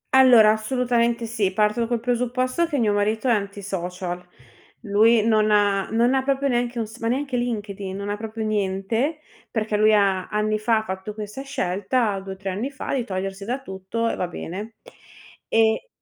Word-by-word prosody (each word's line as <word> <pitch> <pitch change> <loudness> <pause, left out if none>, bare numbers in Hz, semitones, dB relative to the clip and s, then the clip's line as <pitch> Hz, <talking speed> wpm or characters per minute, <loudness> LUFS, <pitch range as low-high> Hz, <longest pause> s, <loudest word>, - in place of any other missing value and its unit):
Allora, 240 -5 +8
assolutamente 235 +1 0
sì. 220 -4 0
Parto 215 +3 +1
col 240 -1 0
presupposto 250 +6 0
che 295 - -2
mio 220 -5 +2
marito 215 +4 0
è 245 - +4
anti-social. 185 -3 -3 0.6
Lui 220 +1 +4
non 215 -1 +3
ha 205 -2 +3
non 235 +3 +2
ha 265 - +3
proprio 275 +1 0
neanche 240 -1 0
un 230 - 0
s 220 +2 -12
ma 230 - -2
neanche 265 +2 -1
LinkedIn, 205 -5 -3
non 200 0 -5
ha 205 - -2
proprio 220 0 -5
niente, 215 +8 -1 0.3
perché 215 -1 -1
lui 215 +1 +5
ha, 195 -3 +2
anni 215 0 0
fa, 220 0 +2
fatto 190 +1 -6
questa 210 +4 -6
scelta, 210 -4 -1
2 195 0 -7
o - - -10
3 190 -1 -4
anni 215 +9 -3
fa, 280 - -5
di 265 -3 0
togliersi 195 -1 -4
da 245 +6 -2
tutto, 190 0 -4
e - - -1
va 180 - -2
bene. 200 +6 -7 0.7
E 225 - +2
220 Hz, 180 wpm, -23 LUFS, 200-240 Hz, 0.7 s, Allora